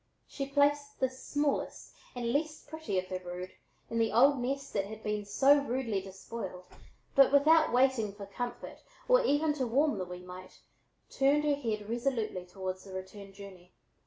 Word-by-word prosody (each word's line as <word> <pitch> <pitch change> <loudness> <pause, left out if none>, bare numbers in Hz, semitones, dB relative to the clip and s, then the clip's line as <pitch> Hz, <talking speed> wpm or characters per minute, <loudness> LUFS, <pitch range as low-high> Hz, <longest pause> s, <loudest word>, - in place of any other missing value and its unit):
She 275 -1 -5
placed 285 0 +1
this 260 0 -2
smallest 290 -1 -2 0.2
and 235 -1 -2
least 305 +1 -2
pretty 315 -11 -4
of 185 - 0
her 185 - -3
brood 180 0 -7 0.4
in 230 - -2
the 225 -1 +2
old 270 +4 +5
nest 275 +3 -3
that 195 -1 0
had 220 +1 -9
been 210 -1 -2
so 275 +8 +5
rudely 245 -7 -2
despoiled, 190 -1 -7 0.5
but 275 -1 +6
without 310 +3 +5
waiting 245 -5 +2
to 200 -1 -8
comfort 240 +5 -6 0.3
or - - +5
even 300 -5 +2
to 265 -4 -2
warm 275 -1 +2
the 185 - -2
wee 180 0 -8
mite, 180 +1 -11 0.5
turned 280 +2 +3
her 295 -1 +2
face 225 -7 -3
resolutely 225 -5 -2
toward 185 0 -4
the 190 +1 -13
return 190 +1 -8
journey. 190 -2 -13
235 Hz, 170 wpm, -31 LUFS, 195-280 Hz, 0.5 s, but